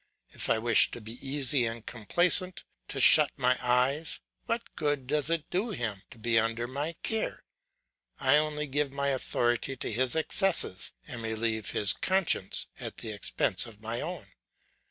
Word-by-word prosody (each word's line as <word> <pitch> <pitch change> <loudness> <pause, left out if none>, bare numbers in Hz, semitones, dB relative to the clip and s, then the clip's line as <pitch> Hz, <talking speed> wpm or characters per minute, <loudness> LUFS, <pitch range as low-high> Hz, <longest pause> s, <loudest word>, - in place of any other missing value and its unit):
If - - -1
I - - +3
wish 115 0 +4
to - - -8
be 115 +2 -10
easy 135 -1 +1
and 115 0 -4
complaisant, 175 - +1 0.2
to - - -4
shut 150 -2 +8
my 125 -1 +2
eyes, 130 +5 +1 0.3
what 230 0 -3
good 145 -4 -1
does 150 +2 0
it 165 -2 -1
do 200 +6 0
him 115 - -3
to - - -14
be 115 0 +2
under 115 +1 -1
my 145 +6 -4
care? 220 -1 -1 0.8
I 135 +2 +4
only 150 0 0
give 145 0 -1
my 140 0 -1
authority 130 0 -1
to - - -3
his 125 +4 +1
excesses, 165 - +2
and 120 -2 -6
relieve 110 -1 -2
his 100 -1 +1
conscience 185 - 0
at - - -5
the 110 - -5
expense 105 +3 0
of 110 -3 -12
my 115 +2 -2
own. 175 0 -5
130 Hz, 165 wpm, -29 LUFS, 115-150 Hz, 0.8 s, shut